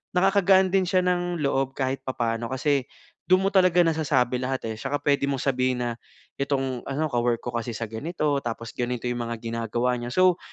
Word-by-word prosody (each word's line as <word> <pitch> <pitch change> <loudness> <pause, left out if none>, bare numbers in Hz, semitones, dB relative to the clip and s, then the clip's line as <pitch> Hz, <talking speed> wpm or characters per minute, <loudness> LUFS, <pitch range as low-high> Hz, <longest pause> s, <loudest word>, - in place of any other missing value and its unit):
nakakagaan 190 0 +4
din 195 -1 +4
siya 185 0 +2
ng 175 -2 0
loob 135 -1 0
kahit 135 0 -1
papaano 115 -2 -1
kasi 135 0 0 0.4
dun 185 +1 +5
mo 195 - 0
talaga 185 -2 +5
nasasabi 145 -6 +1
lahat, 130 -1 -2
eh, - - -8
tsaka 140 +4 -1
pwede 140 -1 +2
mong 135 -2 -1
sabihin 125 -1 0
na 120 - -1 0.5
itong 135 -3 -1
ano, 145 +3 -1
ka-work 120 -1 +1
ko 120 - -4
kasi 120 0 -2
sa 115 - -3
ganito 150 +3 -1
tapos 115 0 -5
ganito 125 -1 -3
yung 120 0 -1
mga 115 0 -3
ginagawa 115 +2 -1
niya. 120 - -5
So, 185 +1 +4
135 Hz, 190 wpm, -25 LUFS, 120-170 Hz, 0.5 s, dun